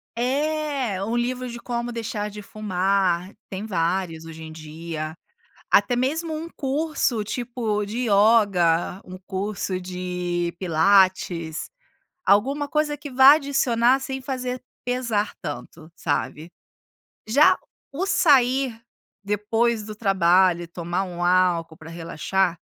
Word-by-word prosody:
É, 275 -4 -1
um 225 +3 -2
livro 250 +1 -1
de 235 - -7
como 240 0 -3
deixar 220 -2 -3
de 210 0 -9
fumar. 190 -3 0 0.2
Tem 195 +2 -5
vários 170 -3 -1
hoje 160 0 -9
em 160 - -8
dia. 155 0 -6 0.6
Até 245 - +4
mesmo 315 +6 -1
um 320 +2 -5
curso, 275 -5 -1
tipo, 225 -2 -2
de 235 +5 -3
ioga, 200 -5 +3
um 185 0 -9
curso 190 0 -3
de 180 -1 -3
pilates, 175 -2 +2 0.6
alguma 275 +9 +3
coisa 300 0 0
que 290 0 -8
vá 265 +2 +8
adicionar 265 -4 +2
sem 265 0 -5
fazer 255 -1 -4 0.2
pesar 240 -4 -1
tanto, 160 +1 -8
sabe. 155 +2 -3 0.8
Já 285 +7 +5 0.3
o 335 +8 -2
sair, 265 - +3 0.4
depois 215 +3 0
do 215 0 -8
trabalho 185 -3 +3
e - - -9
tomar 175 +2 -3
um 175 -2 -5
álcool 175 -3 +2
para 160 - -11
relaxar, 170 +2 -1
205 Hz, 120 wpm, -24 LUFS, 175-250 Hz, 0.8 s, vá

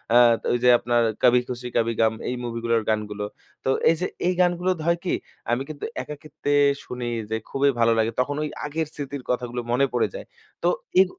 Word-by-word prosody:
আত 120 -1 +6
ওইযে 120 +1 +3
আপনার 120 0 +2 0.2
'কাভি 125 0 +6
খুশি 125 0 -4
কাভি 115 0 +2
গাম' 110 0 +3
এই 125 - -1
মুভিগুলোর 115 -1 0
গানগুলো। 105 -1 -1 0.4
তো - - +1 0.2
এইযে 165 +2 -1 0.2
এই 180 - +3
গানগুলো 175 0 +2
দ - - -15
হয় 170 - +3
কি? - - +1 0.4
আমি 120 +2 +1
কিন্তু 150 -2 -5 0.2
একাকিত্বে 150 -1 -4 0.3
শুনেই 120 -1 -4 0.2
যাই, 110 0 -1
খুবই 140 +1 +2
ভালো 115 0 +5
লাগে। 110 +1 +2
তখন 145 +3 +1
ওই 150 - -2 0.2
আগের 155 +1 -2
স্মৃতির 140 -3 -6
কথাগুলো 125 -1 -1
মনে 130 +3 +4
পড়ে 125 - +2
যায়। - - -7 0.4
তো - - +3 0.3
এই 190 - +8
125 Hz, 190 wpm, -24 LUFS, 115-145 Hz, 0.4 s, এই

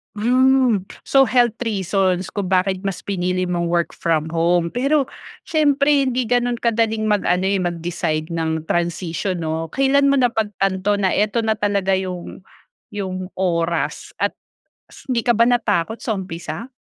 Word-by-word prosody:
Hmm. 255 +1 +3 0.2
So, 270 -2 +4
health 240 -2 +2
reasons 190 -4 0
kung 200 -3 -3
bakit 185 0 +1
mas 195 - -4
pinili 185 -1 -1
mong 175 -1 -1
work 170 0 0
from 160 -1 -1
home. 170 0 +1
Pero 275 +2 +1 0.3
siyempre, 285 -2 +2
hindi 255 0 0
ganun 245 +1 +1
kadaling 225 -2 0
mag-ano 190 -4 +1
eh, 195 0 +1
mag-decide 170 -2 -2
ng 160 -1 -2
transisyon 175 +1 -2
'no. 160 +1 -2
Kailan 275 - +2
mo 280 - +4
napagtanto 205 -5 +1
na 195 -2 +1
eto 215 +3 +1
na 220 -1 0
talaga 200 -2 +1
yung 180 -2 -6 0.5
yung 185 -2 -5
oras, 170 -2 -1
at - - 0 0.8
hindi 235 -1 0
ka 240 - +4
ba 230 - +3
natakot 225 -4 +1
sa 225 - -2
umpisa? 190 +6 -6
195 Hz, 145 wpm, -20 LUFS, 175-235 Hz, 0.8 s, So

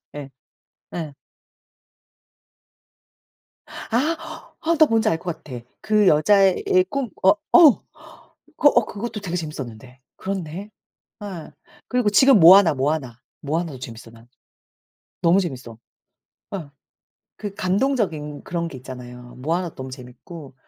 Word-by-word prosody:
예. 145 -2 -7 0.7
예. 155 -4 -5 2.5
아 320 +7 -4 0.2
아 335 +1 +2
나 315 - +7
뭔지 225 -4 +1
알 165 - 0
것 175 -3 -6
같아. 125 -4 -8 0.2
그 210 -2 +2
여자애 190 +5 +4
애 185 0 +4
꿈 270 -2 -3
어 190 - +6 0.2
어 320 -8 +7 0.7
그 295 - +5
어 - - +2
그것도 215 +1 -6
되게 180 -3 -4
재밌었는데. 130 -6 -7 0.2
그렇네. 190 +1 -5 0.5
예. 185 -6 -8 0.4
그리고 250 -4 +1
지금 260 +2 +5
모아나, 175 0 +8
모아나, 135 -3 -2 0.2
모아나도 155 -1 -3
재밌어 115 -2 -10
난. 115 0 -18 1.0
너무 175 +3 +4
재밌어. 125 - -6 0.8
예. 155 -6 -8 0.7
그 205 -2 -7
감동적인 185 - -1
그런 170 -2 -3
게 145 - -10
있잖아요. 125 -1 -11
모아나도 165 +5 -2
너무 130 0 -7
재밌고. 130 +4 -11
170 Hz, 235 characters per minute, -22 LUFS, 135-205 Hz, 2.5 s, 모아나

